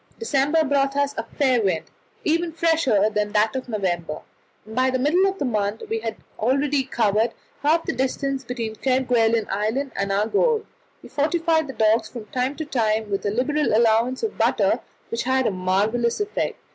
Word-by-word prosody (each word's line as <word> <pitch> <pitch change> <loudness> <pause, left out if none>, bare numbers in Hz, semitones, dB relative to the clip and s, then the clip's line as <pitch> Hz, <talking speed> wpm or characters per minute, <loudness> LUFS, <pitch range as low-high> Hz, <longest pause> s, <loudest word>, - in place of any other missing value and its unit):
December 310 -5 +2
brought 275 -1 +1
us 285 0 +1
a - - -2
fair 260 -4 +1
wind, 185 -6 0 0.4
even 335 +2 +1
fresher 315 -11 +2
than 210 -1 -1
that 215 +2 +2
of 255 -1 -4
November, 175 -7 -2 0.4
and 220 +1 -10
by 255 +1 +3
the 255 - 0
middle 320 +9 +3
of 390 - -6
the 285 - -2
month 210 -3 -1
we 225 - 0
had 225 -1 -4 0.2
already 275 +4 +1
covered 225 -3 +1 0.3
half 320 +3 +3
the - - -1
distance 270 +1 -1
between 235 -3 -4
Kerguelen 235 -2 +2
Island 225 +7 -1
and 200 0 -1
our 200 +2 +2
goal. 445 - +1 0.4
We - - -11
fortified 320 +1 +1
the 270 - -6
dogs 220 0 +2
from 235 -4 -8
time 255 +2 -1
to 315 - -5
time 220 -6 0
with 195 +1 -1
a - - +2
liberal 260 +4 +1
allowance 230 +3 +2
of 440 - -3
butter, - - +2 0.3
which 230 - -2
had 260 +1 +1
a - - +2
marvellous 205 - 0
effect. 415 0 -2
250 Hz, 185 wpm, -23 LUFS, 215-285 Hz, 0.4 s, by